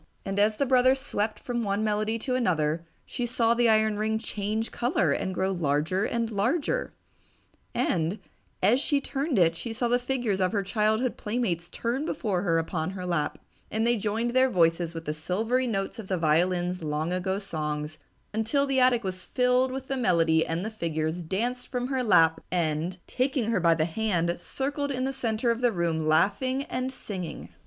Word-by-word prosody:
And 195 +1 -2
as 210 +1 +3
the 280 - +2
brother 255 0 +5
swept 215 -5 -2
from 240 -1 -3
one 200 +1 0
melody 215 +1 0
to 255 +3 -3
another, 165 -9 +1 0.2
she 245 -2 -3
saw 230 -1 +2
the 235 0 +3
iron 220 -1 +3
ring 220 +1 0
change 215 0 -3
color 235 - +1
and 190 - -1
grow 190 +1 0
larger 160 +3 0
and 230 -1 -1
larger. 275 - 0 0.8
And, 170 +3 0 0.5
as 225 +7 +5
she 290 -1 +2
turned 280 0 -2
it, 165 -2 +4
she 230 +7 -5
saw 240 +2 0
the 245 +1 +3
figures 245 -6 -1
of 185 +2 +1
her 200 -2 +1
childhood 220 +4 +1
playmates 210 -7 -2
turn 240 +5 -2
before 205 - -1
her 170 -4 +2
upon 165 0 -1
her 180 - -5
lap, 170 -4 -1 0.3
and 220 +1 0
they 240 0 +3
joined 220 +2 -1
their 260 +1 +4
voices 170 -3 +2
with 165 0 -6
the 150 - -1
silvery 220 +11 0
notes 195 +1 -2
of 210 - -7
the 185 - 0
violin's 175 +2 +1
long 155 +3 -1
ago 190 +1 -1
songs 155 -5 -4 0.3
until 225 +6 +1
the 270 -1 +1
attic 250 -2 +4
was 185 -1 -4
filled 250 +1 +2
with 265 0 -5
the 270 - -2
melody 165 -8 +3
and 165 +4 -3
the 220 - -3
figures 160 -4 -2
danced 235 +9 -2
from 250 0 -3
her 260 -2 0
lap 165 -7 +4
and, 170 0 -1
taking 255 -3 0
her 215 - +2
by 170 -1 +4
the 155 -1 +1
hand, 175 -2 0
circled 285 +6 -2
in 255 -2 -2
the 270 +1 -1
center 235 -2 0
of 230 +1 -2
the 245 - +4
attic 225 -6 -2
room 160 -2 0
laughing 230 - +2
and 255 +1 -2
singing. 190 -9 -6
210 Hz, 190 wpm, -27 LUFS, 175-245 Hz, 0.8 s, brother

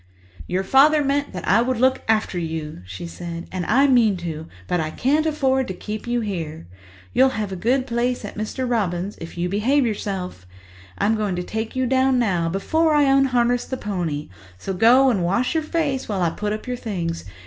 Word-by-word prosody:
"Your 185 +2 -1
father 290 +8 +5
meant 285 +1 0
that 180 - -6
I 215 +5 +5
would 255 0 0
look 260 +1 +3
after 215 -4 +1
you," 160 - -5
she 95 - -7
said, 170 0 -7
"and 185 -2 -3
I 270 +5 +4
mean 235 -7 +4
to, 160 -2 -6 0.2
but 180 - 0
I 155 -1 -1
can't 295 - +1
afford 265 -4 +1
to 185 - -5
keep 215 +4 -6
you 240 0 0
here. 165 - -4 0.5
You'll 260 0 +3
have 210 -2 -2
a - - -3
good 250 +8 +1
place 245 -1 -1
at 205 - -8
Mr. 215 +5 -3
Robins', 200 -5 -1
if 165 +1 -8
you 175 +1 0
behave 240 +9 +2
yourself. 190 - -4 0.5
I'm 210 +2 +2
going 210 -4 -1
to 180 - -3
take 220 +5 -4
you 260 0 +1
down 260 +1 +3
now, 180 -8 +1
before 310 - +1
I 295 - +5
unharness 255 -3 +3
the 260 - -4
pony, 175 -9 -3 0.3
so 195 - -4
go 250 +7 +5
and 195 -6 0
wash 200 - +1
your 320 - +1
face 305 -5 -2
while 195 -4 0
I 165 - +2
put 210 +3 -3
up 215 0 -4
your 250 -1 -3
things. 175 -8 -4
215 Hz, 205 wpm, -22 LUFS, 180-260 Hz, 0.5 s, father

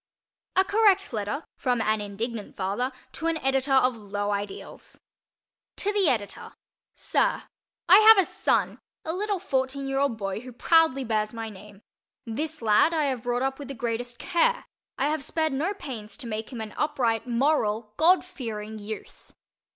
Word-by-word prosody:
A 380 - +5
Correct 405 - +3
Letter 215 +8 -2
from 250 -3 0
an 215 -1 +1
Indignant 210 +2 -5
Father 200 +7 -1 0.2
to 325 - -4
an 330 -1 +1
Editor 270 -1 0
of 255 -2 +4
Low 205 -1 -3
Ideals 200 0 -6 0.8
To 410 +1 -1
the 395 -6 +3
Editor: 215 -6 -3 0.4
Sir: - - 0 0.4
I 375 +4 +9
have 440 0 +9
a 385 - +5
son—a 320 - -2
little 405 +2 -1
fourteen 270 -3 -2
year 270 0 -1
old 275 -5 +1
boy 195 -1 -3
who 250 +1 -10
proudly 320 0 +3
bears 215 -2 -1
my 225 -1 -4
name. 205 +1 -14 0.4
This 300 +5 -4
lad 220 +10 +4
I 310 - +2
have 260 -4 -2
brought 245 +1 0
up 270 +1 -1
with 285 - -7
the 275 - -6
greatest 240 +1 -3
care. 485 - +1 0.3
I 270 - +1
have 305 -2 -1
spared 315 -1 -1
no 310 +8 0
pains 225 - -7
to - - -8
make 220 -1 -4
him 240 -3 -5
an 215 -1 -6
upright, 250 -6 0
moral, 235 -4 +1
God 350 +4 +4
fearing 220 -10 -6
youth. 215 +1 -9
255 Hz, 165 wpm, -26 LUFS, 220-310 Hz, 0.8 s, I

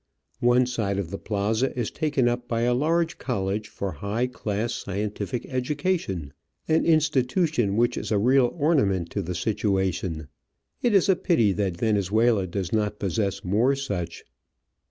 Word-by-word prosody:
One 120 +1 +4
side 110 -5 -2
of 95 -4 -3
the 100 - -5
plaza 110 +5 -1
is 120 -3 -1
taken 145 -5 +1
up 120 0 -1
by 115 -1 -1
a 120 +1 +2
large 165 +5 +1
college 105 -3 -2
for 100 -1 -4
high 100 +9 -2
class 115 -2 -3
scientific 105 +4 -3
education 130 - -2 0.3
^an 160 0 +2
institution 150 - +2
which 120 +1 +2
is - - -4
a 105 - +3
real 125 +3 +4
ornament 105 - +1
to 100 - -2
the 90 -1 -4
situation. 95 -5 -1 0.5
It 235 -4 +2
is 195 0 +4
a 190 - +5
pity 120 - +2
that 95 -3 -1
Venezuela 105 0 +2
does 90 0 -4
not 105 -1 0
possess 100 0 -1
more 110 +9 +2
such. 95 -12 -4
110 Hz, 155 wpm, -25 LUFS, 100-130 Hz, 0.5 s, a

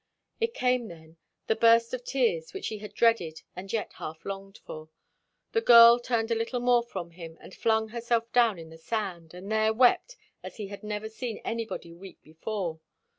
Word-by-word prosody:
It 460 0 -1
came 250 -2 +1
then, 160 -2 -14 0.3
the 220 - +1
burst 230 +1 +4
of 250 -1 -4
tears 230 -13 -1
which - - -4
he 215 - -6
had 205 0 -10
dreaded 210 -10 +1
and 190 +2 -8
yet 225 -2 -3
half 160 +1 -8
longed 195 0 -7
for. 155 0 -9 0.6
The 450 - +1
girl 235 - +9
turned 235 -2 -1
a - - +3
little 230 +2 -2
more 245 0 +3
from 185 -8 -7
him 165 -1 -10
and - - -13
flung 220 -1 +1
herself 235 0 -2
down 230 -6 +3
on 160 -1 -11
the 160 - -13
sand, 175 -3 -4
and 190 +4 -8
there 220 0 +3
wept 255 - +3 0.3
as - - -9
he 205 -3 -6
had 200 - -9
never 210 0 -4
seen 225 +1 -5
anybody 225 -7 -4
weep 185 +2 -13
before. 165 +1 -5
220 Hz, 190 wpm, -28 LUFS, 175-235 Hz, 0.6 s, girl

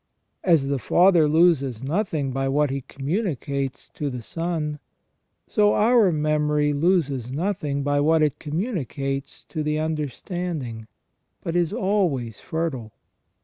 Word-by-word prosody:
As 165 -7 +3
the 140 -1 0
Father 175 - +4
loses 150 -7 +3
nothing 155 -3 -1
by 135 +1 -1
what 145 0 +2
He 135 0 -2
communicates 140 - -3
to 145 - -4
the 125 -3 -6
Son, 160 0 -3 0.7
so 210 -2 +3
our 225 -3 +5
memory 150 -1 +1
loses 145 -6 +1
nothing 150 -3 -1
by 145 0 +1
what 155 +2 +4
it 150 -1 0
communicates 145 - -3
to 155 - -3
the 150 0 0
understanding, 155 - -3 0.6
but 165 - -3
is 175 -2 +2
always 165 - 0
fertile. 145 -9 -3
150 Hz, 125 wpm, -24 LUFS, 135-170 Hz, 0.7 s, our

